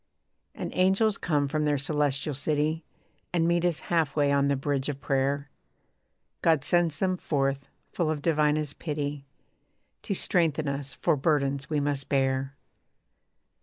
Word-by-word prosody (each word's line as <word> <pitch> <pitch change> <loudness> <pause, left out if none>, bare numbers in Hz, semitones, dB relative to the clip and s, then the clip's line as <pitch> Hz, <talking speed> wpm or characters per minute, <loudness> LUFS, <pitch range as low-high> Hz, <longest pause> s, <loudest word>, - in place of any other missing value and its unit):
And - - -5
angels 195 +3 +2
come 145 -3 +1
from 155 +2 -1
their 145 -1 +2
Celestial 145 0 0
City 150 +3 0 0.5
And 165 -2 +2
meet 170 0 +2
us 175 -3 +1
half 160 -5 0
way 145 -2 +3
on 140 0 +3
the 140 - +2
bridge 140 0 -1
of 140 -2 -4
prayer. 140 +1 -1 0.9
God 160 -5 +3
sends 175 -1 +2
them 185 -1 0
forth, 135 -4 -1 0.3
full 170 -3 0
of 150 -2 -2
divinest 150 -2 +1
pity 145 -3 -4 0.7
To 200 - -3
strengthen 160 -5 +1
us 140 0 -4
for 165 - +2
burdens 140 -1 0
we 150 -2 +1
must 140 -1 -2
bear. 135 0 0
145 Hz, 145 wpm, -27 LUFS, 140-160 Hz, 0.9 s, way